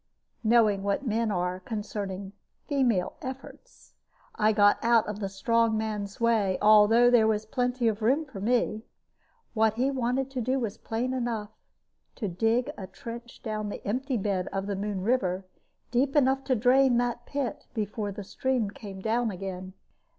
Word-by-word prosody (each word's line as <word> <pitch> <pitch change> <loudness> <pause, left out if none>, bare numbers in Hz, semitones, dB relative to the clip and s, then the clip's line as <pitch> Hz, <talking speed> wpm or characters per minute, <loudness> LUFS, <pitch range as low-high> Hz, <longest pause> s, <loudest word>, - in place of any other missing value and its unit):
Knowing 220 -3 +4
what 200 +7 -1
men 230 -1 0
are 180 -2 -1
concerning 200 -2 -5 0.3
"female 245 -10 +1
efforts," 265 - -10 0.4
I 215 - +3
got 205 -1 +4
out 230 -1 +4
of 210 -1 -4
the 195 -2 -3
strong 225 +3 +1
man's 210 -2 -4
way, 220 -5 +2
although 215 +3 +6
there 230 -3 +5
was 215 -1 0
plenty 245 +1 0
of 220 0 0
room 270 +8 +2
for 255 -9 -9
me. 225 -1 +1 0.7
What 220 -1 +2
he 260 +4 +1
wanted 260 +1 -1
to 260 -2 -3
do 260 +3 0
was 225 -5 -4
plain 240 +3 -2
enough 230 -4 -2 0.6
to 215 - -3
dig 225 +7 +1
a 190 - -6
trench 235 +2 -9
down 215 -2 -3
the - - -7
empty 255 +5 -1
bed 195 -3 -1
of 195 0 -2
the 200 0 -2
Moon 200 -1 -3
River, 190 -4 0 0.5
deep 265 +4 +1
enough 270 -1 +3
to 260 - +2
drain 250 +2 +4
that 240 0 -1
pit 280 -3 -3
before 210 -1 -2
the 205 +1 -7
stream 245 0 -1
came 195 -3 -9
down 230 +2 +1
again. 185 -1 -6
220 Hz, 165 wpm, -28 LUFS, 205-245 Hz, 0.7 s, although